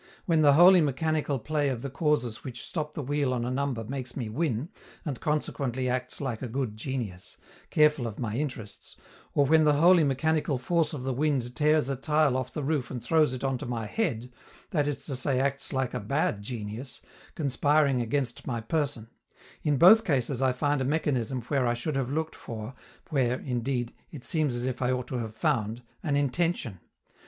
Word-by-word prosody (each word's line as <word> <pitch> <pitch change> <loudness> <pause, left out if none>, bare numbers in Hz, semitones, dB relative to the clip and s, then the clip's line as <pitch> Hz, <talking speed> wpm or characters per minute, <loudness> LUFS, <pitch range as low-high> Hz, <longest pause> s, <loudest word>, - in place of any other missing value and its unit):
When 165 -3 +3
the 145 -2 +6
wholly 175 +4 +8
mechanical 150 0 0
play 145 +3 0
of 125 -3 -3
the 140 - -3
causes 140 -7 0
which 125 -3 -6
stop 150 -3 -4
the 150 - -3
wheel 145 0 0
on 120 -1 -2
a 125 - -2
number 130 -3 -1
makes 130 +1 -6
me 120 -5 -3
win, 140 +2 -1 0.4
and 140 -6 -4
consequently 135 -4 -1
acts 125 0 -2
like 130 -6 -3
a 130 - -3
good 120 -2 -3
genius, 110 -6 -5 0.3
careful 150 -5 +3
of 110 - -7
my 110 -3 -3
interests, 120 -7 -5 0.4
or 145 - +4
when 160 +3 +5
the 150 -1 +5
wholly 170 +3 +6
mechanical 150 +1 +1
force 165 +6 0
of 135 -4 -5
the 130 0 -1
wind 130 -3 0
tears 150 -3 +3
a 135 - -1
tile 150 0 +2
off 130 -1 -2
the 150 - -4
roof 140 -4 -1
and 125 -3 -6
throws 155 -5 +3
it 130 - -7
on 135 -2 0
to - - -6
my 115 -2 -3
head, 125 - -2 0.4
that 145 -4 +1
is 140 -1 -3
to 140 - -2
say 130 0 0
acts 140 +1 0
like 130 -3 -1
a 125 - -2
bad 115 -1 0
genius, 110 +3 -6 0.3
conspiring 145 -2 +2
against 120 +1 -2
my 120 -3 -1
person: 135 -2 -2 0.5
in 145 -2 +1
both 215 - +8
cases 135 - 0
I 130 -1 +3
find 145 +2 0
a - - +1
mechanism 130 -4 0
where 130 0 0
I 120 - +1
should 135 +5 -3
have 135 -2 -1
looked 160 +3 -2
for, 110 +1 -7 0.4
where, 130 -3 +1
indeed, 120 -1 -2 0.2
it 145 -6 -9
seems 150 -5 +1
as 120 +1 -3
if 130 0 -3
I 125 0 +2
ought 125 -1 -2
to 125 - -2
have 110 -2 -5
found, 115 +2 -1 0.2
an 145 -4 0
intention. 145 - 0
135 Hz, 200 wpm, -28 LUFS, 120-150 Hz, 0.5 s, wholly